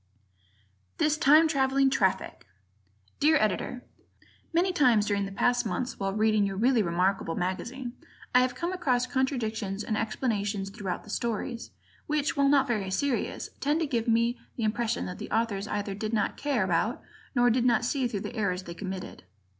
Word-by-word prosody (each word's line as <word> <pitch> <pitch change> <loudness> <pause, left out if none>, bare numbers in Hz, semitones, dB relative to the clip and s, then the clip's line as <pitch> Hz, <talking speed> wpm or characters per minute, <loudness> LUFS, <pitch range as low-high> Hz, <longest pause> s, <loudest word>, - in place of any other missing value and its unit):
This 305 0 +2
Time 305 +2 +6
Traveling 270 -2 +2
Traffic 190 - 0 0.7
Dear 310 +2 +5
Editor: 230 +2 -1 0.7
Many 355 +3 +2
times 245 -10 +4
during 200 -1 0
the - - -8
past 245 +5 +2
months, 245 +3 -3
while 195 0 -1
reading 215 0 +2
your 195 -1 -1
really 240 +2 +3
remarkable 180 -1 0
magazine, 240 +8 -3 0.4
I 250 - +7
have 255 0 +1
come 345 +2 -2
across 255 -9 +1
contradictions 225 -6 -2
in 215 - -2
explanations 210 -3 -2
throughout 195 -4 -4
the 210 - -10
stories, 235 +1 -3 0.4
which, 300 -1 0
while 280 -1 +3
not 275 -1 +4
very 210 -5 -1
serious, 250 +6 -1
tend 295 +3 +1
to - - +2
give 240 -5 -1
me 230 +1 +2 0.2
the 235 - -3
impression 230 +2 0
that 180 - -6
the - - -6
Authors 215 -3 0
either 205 -1 -2
did 215 +3 -4
not 220 - 0
care 280 -8 0
about 190 +6 0 0.3
or 245 -1 +4
did 240 +1 +2
not 240 -1 +3
see 260 0 0
through 205 -4 -4
the 240 - -6
errors 190 -4 -1
they 170 - -7
committed. 190 0 -6
230 Hz, 170 wpm, -28 LUFS, 200-265 Hz, 0.7 s, I